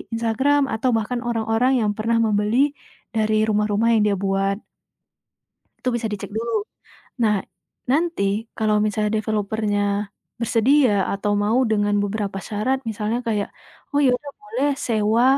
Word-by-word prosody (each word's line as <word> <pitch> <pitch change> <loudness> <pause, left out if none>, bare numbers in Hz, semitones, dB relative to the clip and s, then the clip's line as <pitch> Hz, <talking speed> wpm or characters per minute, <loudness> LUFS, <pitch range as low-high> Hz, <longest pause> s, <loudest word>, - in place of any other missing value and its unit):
Instagram 265 +6 +2
atau 225 +4 0
bahkan 225 +3 -1
orang-orang 235 +1 +1
yang 210 - +1
pernah 230 +2 0
membeli 220 +6 +2 0.4
dari 215 -1 +2
rumah-rumah 210 +1 +2
yang 220 - +4
dia 205 - +2
buat. 195 +1 -1 1.2
Itu - - -6
bisa 235 -1 -1
dicek 205 - -6
dulu. 235 +1 -2 0.7
Nah, 210 -1 +3 0.6
nanti 330 -3 +1 0.3
kalau 215 -1 +2
misalnya 210 0 0
developer-nya 215 -1 -1 0.6
bersedia 240 +2 +3 0.2
atau 205 +1 -1
mau 215 +4 +2
dengan 205 -1 +2
beberapa 205 -1 -2
syarat 220 +6 -1
misalnya 220 +2 -2
kayak 210 -3 0 0.4
"oh 285 - +3
ya 255 - +5
udah 285 +1 -10
boleh 420 -7 -1 0.2
sewa," 220 +1 +2
220 Hz, 135 wpm, -22 LUFS, 210-240 Hz, 1.2 s, ya